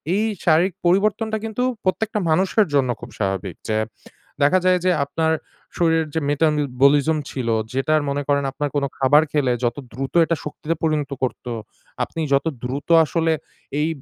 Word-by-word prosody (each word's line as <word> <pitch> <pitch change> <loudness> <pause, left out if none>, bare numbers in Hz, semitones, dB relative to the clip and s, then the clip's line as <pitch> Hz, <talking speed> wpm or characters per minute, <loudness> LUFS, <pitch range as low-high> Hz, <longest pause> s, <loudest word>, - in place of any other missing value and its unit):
এই 215 - +1 0.2
শারীরিক 175 +3 +4
পরিবর্তনটা 215 +4 +2
কিন্তু 225 +3 -2 0.2
প্রত্যেকটা 210 +3 0
মানুষের 190 +6 +3
জন্য 135 -3 +3
খুব - - -8
স্বাভাবিক। 95 -3 -2
যে 110 - +1 0.7
দেখা 180 +6 +5
যায় 185 0 +4
যে 185 - +4
আপনার 160 +2 0 0.4
শরীরের 165 -2 +2
যে 160 - +1
মেটাবলিজম 145 0 +2
ছিল 125 -3 -3 0.2
যেটা 135 +4 +1 0.2
মনে 145 +1 -1
করেন 140 -1 +2
আপনার 145 +1 -2
কোন 140 - +1
খাবার 145 +3 +5
খেলে 135 -5 +2
যত 120 - 0 0.2
দ্রুত 135 +5 -5
এটা 165 0 0
শক্তিতে 150 +2 -3
পরিণত 155 -3 0
করত, 130 -1 -2 0.6
আপনি 165 - -7
যত 140 - +2 0.2
দ্রুত 135 +5 -4 0.2
আসলে 165 +1 0 0.5
এই 155 - +1
155 Hz, 155 wpm, -22 LUFS, 140-175 Hz, 0.7 s, দেখা